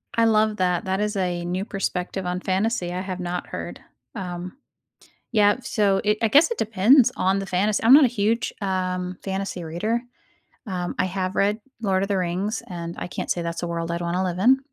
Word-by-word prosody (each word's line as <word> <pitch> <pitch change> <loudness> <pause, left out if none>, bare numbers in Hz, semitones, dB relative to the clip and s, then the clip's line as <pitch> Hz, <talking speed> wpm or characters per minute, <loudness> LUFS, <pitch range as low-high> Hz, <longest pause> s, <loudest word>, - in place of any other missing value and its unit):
I 230 - +4
love 215 -1 +3
that, 180 -1 +1
that 190 +1 -1
is 210 0 -1
a 180 -2 -1
new 185 +3 -2
perspective 190 -2 -3
on 180 0 -2
fantasy 190 -1 -1
I 180 - -2
have 185 -1 -5
not 175 0 -3
heard, - - -7 0.3
um. 180 0 -6 0.7
Yep, 210 +2 +3
so 200 -3 +1
it 210 0 +2
I - - +5
guess 290 - +5
it 470 - -3
depends 225 +5 +4
on 190 +1 +1
the 195 - -4
fantas 200 +3 +1
I'm 235 - +7
not 290 +1 +9
a - - +5
huge, 225 0 0
um, 185 -2 -2
fantasy 190 -2 -3
reader. 210 +9 -1 0.7
Um, 180 -3 -3
I - - +2
have 185 0 -3
read 205 +2 +2 0.2
Lord 190 -3 +1
of 195 - -1
the 200 - +1
Rings, 185 +5 -2
and 170 -2 -6
I - - -4
can't - - -5
say 175 - 0
that's 170 0 -4
a - - -1
world 170 0 -3
I'd 170 - -2
want 170 0 -2
to 185 - +1
live 180 -1 -2
in. 260 +5 +5
190 Hz, 210 wpm, -24 LUFS, 180-210 Hz, 0.7 s, not